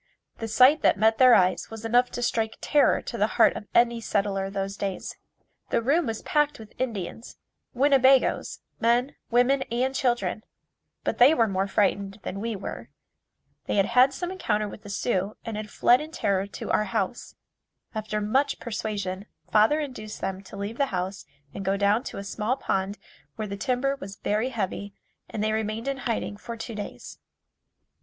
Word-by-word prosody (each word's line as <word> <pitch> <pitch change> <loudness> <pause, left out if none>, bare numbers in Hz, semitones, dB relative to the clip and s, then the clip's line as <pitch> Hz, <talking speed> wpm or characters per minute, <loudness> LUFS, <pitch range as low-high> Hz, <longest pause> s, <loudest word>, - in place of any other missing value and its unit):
The 225 - -3
sight 255 +7 +5
that - - +4
met 220 +2 +3
their 255 -2 +8
eyes 185 -2 +2
was 225 0 -8
enough 245 +2 +3
to 245 - -3
strike 225 -2 0
terror 295 -1 +3
to 235 - -6
the 210 - +3
heart - - +6
of 205 - -7
any 235 -1 +4
settler 200 -2 0
of 195 - -6
those 195 0 -3
days. 195 -2 -4 0.5
The - - +2
room 285 +7 +2
was 225 -1 -4
packed 295 -1 +1
with 220 -1 -13
Indians 225 -3 -4 0.4
Winnebagoes 270 0 +3 0.2
men, 240 +4 +2
women 250 +3 +3
and 255 +3 0
children, 240 -6 0 0.6
but - - -2
they 265 +6 +7
were 230 -5 +3
more 195 -1 0
frightened 200 0 0
than 195 - -5
we 225 +1 -3
were. 195 - -7 0.8
They - - 0
had 195 -1 +4
had 250 +3 +5
some 355 +5 -4
encounter 215 - -1
with 205 - -10
the 205 - -11
Sioux 200 0 -1
and 225 - -4
had 215 0 -5
fled 245 +5 +4
in 305 - -7
terror 200 -10 0
to 200 - -6
our 215 - +2
house. 210 +2 -3 0.6
After 215 -1 -2
much 240 +7 +1
persuasion, 205 -4 -4 0.2
father 220 +8 +4
induced 230 -8 -6
them 190 0 -3
to 200 - -10
leave 205 +5 -5
the 280 - +3
house 190 -2 -4 0.3
and 195 - -5
go 195 +1 +1
down 205 +4 +2
to - - -6
a 200 - -5
small 215 +5 -2
pond 195 -3 -1 0.4
where 215 - -4
the 200 - -4
timber 255 +5 0
was 195 -4 -8
very 215 +6 -1
heavy 200 -3 -4 0.3
and 210 - -3
they 215 - +1
remained 220 +2 -2
in 275 -1 -1
hiding 230 -5 -3
for 230 +2 -7
two 230 - -6
days. 210 -1 -8
220 Hz, 185 wpm, -26 LUFS, 200-245 Hz, 0.8 s, their